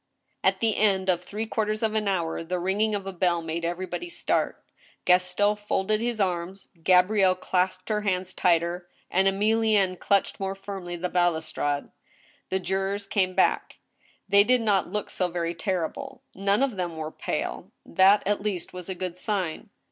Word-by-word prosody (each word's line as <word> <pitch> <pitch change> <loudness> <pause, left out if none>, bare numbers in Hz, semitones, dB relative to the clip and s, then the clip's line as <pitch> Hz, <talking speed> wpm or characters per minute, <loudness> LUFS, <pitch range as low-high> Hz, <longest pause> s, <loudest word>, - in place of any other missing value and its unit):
At - - +2
the 225 -2 +1
end 195 -3 +2
of 175 -1 +2
three 210 +4 -4
quarters 215 -1 -1
of 220 -1 +1
an 215 -1 0
hour, 170 -4 -1
the 180 +2 -2
ringing 200 +4 0
of 200 -1 -4
a 195 - -5
bell 175 -1 +1
made 165 +1 -3
everybody 185 - -3
start. 345 - -1 0.4
Gaston 180 +3 +3
folded 210 +1 0
his 235 -1 -1
arms, 185 0 -2
Gabrielle 185 +1 +4
clasped 185 0 -1
her 210 -1 +1
hands 185 -2 -1
tighter, 175 0 +1 0.2
and 190 +1 +3
Emilienne 210 -1 +2
clutched 200 -1 +1
more 195 0 -2
firmly 195 -3 -6
the 175 +1 -2
balus 175 -3 +1
trade. 145 -1 -2 0.6
The 190 - +1
jurors 195 +2 -2
came 185 -3 0
back. - - +1 0.5
They 200 0 +6
did 250 +2 +3
not 205 -4 +1
look 210 -1 -3
so 180 - 0
very 170 -1 -2
terrible. 175 -2 -3
None 200 +5 +1
of 255 -7 -1
them 175 -3 -3
were 155 0 -4
pale. - - -4 0.2
That, 195 +3 +5
at 205 +1 0
least, 200 -5 -3
was 180 0 -7
a 190 - -3
good 180 0 -5
sign. 185 -7 -2
190 Hz, 170 wpm, -26 LUFS, 180-205 Hz, 0.6 s, They